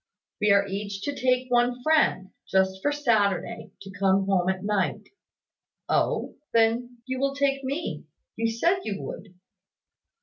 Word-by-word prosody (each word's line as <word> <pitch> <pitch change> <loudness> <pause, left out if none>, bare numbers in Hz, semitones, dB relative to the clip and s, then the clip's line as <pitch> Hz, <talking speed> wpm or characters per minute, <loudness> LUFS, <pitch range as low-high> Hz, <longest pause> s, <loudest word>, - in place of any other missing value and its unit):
"We 210 - +3
are 200 0 +5
each 200 0 -5
to 285 - -2
take 255 -1 0
one 245 0 +2
friend, 310 -11 +2 0.2
just 190 0 +1
for 290 - +1
Saturday, 225 -6 0
to 195 - -10
come 195 0 +2
home 190 -2 +2
at 190 0 -2
night." 200 -7 -1 0.8
"Oh? - - 0 0.2
Then, 235 +2 +1
you 260 0 -3
will 275 0 0
take 275 -1 +1
me. 280 +6 -4 0.3
You 225 0 0
said 340 +12 +2
you 205 -2 -4
would." 195 -3 -8
225 Hz, 145 wpm, -26 LUFS, 195-260 Hz, 0.8 s, are